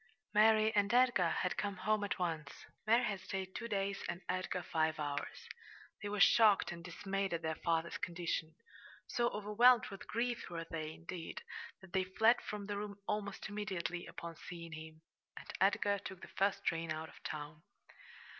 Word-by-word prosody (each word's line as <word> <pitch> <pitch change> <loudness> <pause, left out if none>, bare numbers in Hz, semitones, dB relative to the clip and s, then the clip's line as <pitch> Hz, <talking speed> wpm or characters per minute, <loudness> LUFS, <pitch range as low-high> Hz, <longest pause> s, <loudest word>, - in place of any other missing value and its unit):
Mary 220 +1 +6
and 205 0 +3
Edgar 240 -9 +5
had 180 +2 0
come 200 -2 -1
home 210 +3 +1
at 205 - -1
once. 160 -5 -3 0.2
Mary 230 +3 +5
had 200 -4 -1
stayed 190 0 -4
two 235 - -4
days 195 -2 -1
and 170 0 -3
Edgar 185 0 -1
five 160 -1 +1
hours. 145 -1 -3 0.5
They 205 - -3
were 205 0 -2
shocked 210 -2 +6
and 170 -1 -7
dismayed 195 +1 -2
at 165 - -5
their 160 0 0
father's 165 0 +1
condition. 165 -2 -2 0.5
So 240 0 +1
overwhelmed 215 +3 +5
with 195 -2 -9
grief 240 +1 -1
were 165 -1 -4
they, 155 -2 -4
indeed, 165 +1 -7 0.4
that 190 -2 -15
they 190 -1 +3
fled 220 +6 +4
from 210 -1 -5
the 205 0 -3
room 205 -1 -5
almost 205 -2 -2
immediately 190 -4 -3
upon 170 -1 -7
seeing 170 -1 -8
him, 160 0 -9 0.3
and - - -8 0.2
Edgar 200 +1 +3
took 190 -2 -8
the - - -9
first 195 0 0
train 165 -1 0
out 160 +1 -3
of - - -16
town. 150 0 -6
190 Hz, 175 wpm, -36 LUFS, 165-210 Hz, 0.5 s, Mary